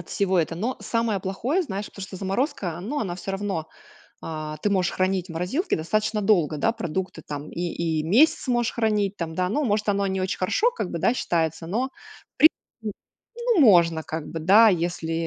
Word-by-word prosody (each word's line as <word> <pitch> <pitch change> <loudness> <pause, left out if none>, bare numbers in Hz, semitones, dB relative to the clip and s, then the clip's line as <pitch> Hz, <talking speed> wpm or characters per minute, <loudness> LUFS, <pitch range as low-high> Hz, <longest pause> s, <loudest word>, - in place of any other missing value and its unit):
от 175 - -12
всего 190 -2 +1
это. 165 0 0
Но 225 +9 -2
самое 230 -3 0
плохое, 240 - -1
знаешь, 205 - -4
потому 195 - -10
что 190 - -9
заморозка, 190 - -2
ну, 270 +10 -3
она 180 -5 -2
всё 190 +2 -6
равно, 195 -5 -3 0.6
а, 155 -1 -5
ты 210 - +2
можешь 190 -3 +1
хранить 185 0 0
в - - -7
морозилке 185 - -1
достаточно 215 +6 0
долго, 175 -7 +2
да, 225 +10 +2
продукты 185 -5 -4
там 145 0 -6
и, - - -7
и 165 -2 -1
месяц 250 - +3
можешь 240 -1 +1
хранить 210 -3 0
там, 165 -1 -4
да. 180 +1 0
Ну, 295 +8 0
может, 210 -1 0
оно 200 0 +1
не 190 -1 -1
очень 185 0 -2
хорошо, 430 - +2
как 475 - -3
бы, - - -3
да, 235 - +3
считается, 165 -7 -1
в - - -9 1.1
принципе, 215 -2 -6 0.6
ну - - +5
можно, 170 - +5
как 160 -1 -4
бы, 165 - -5
да, 210 +7 +7
если, 170 -2 -2
190 Hz, 195 wpm, -24 LUFS, 170-215 Hz, 1.1 s, да